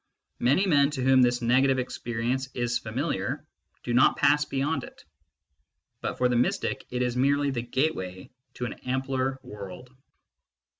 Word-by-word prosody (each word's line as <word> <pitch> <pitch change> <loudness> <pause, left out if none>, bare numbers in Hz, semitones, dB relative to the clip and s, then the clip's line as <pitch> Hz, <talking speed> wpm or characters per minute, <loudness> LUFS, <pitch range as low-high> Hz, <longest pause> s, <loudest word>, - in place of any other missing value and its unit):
Many 140 +11 +3
men 140 -6 +4
to 140 -4 -3
whom 130 0 +5
this 120 -1 +2
negative 130 +3 +3
experience 125 +1 -2
is 120 -1 0
familiar - - -3 0.4
do 120 - -2
not 125 - +5
pass 150 0 +4
beyond 140 0 -1
it, - - -13 1.0
but - - -3
for 125 - +3
the 125 - 0
mystic 120 +1 0
it 125 0 -1
is 125 -1 -1
merely 140 +2 +2
the 120 -3 -2
gateway 115 -8 -2 0.2
to 125 - -3
an 120 - -4
ampler 130 +1 -1
world. 100 +4 -9
125 Hz, 150 wpm, -27 LUFS, 120-135 Hz, 1.0 s, whom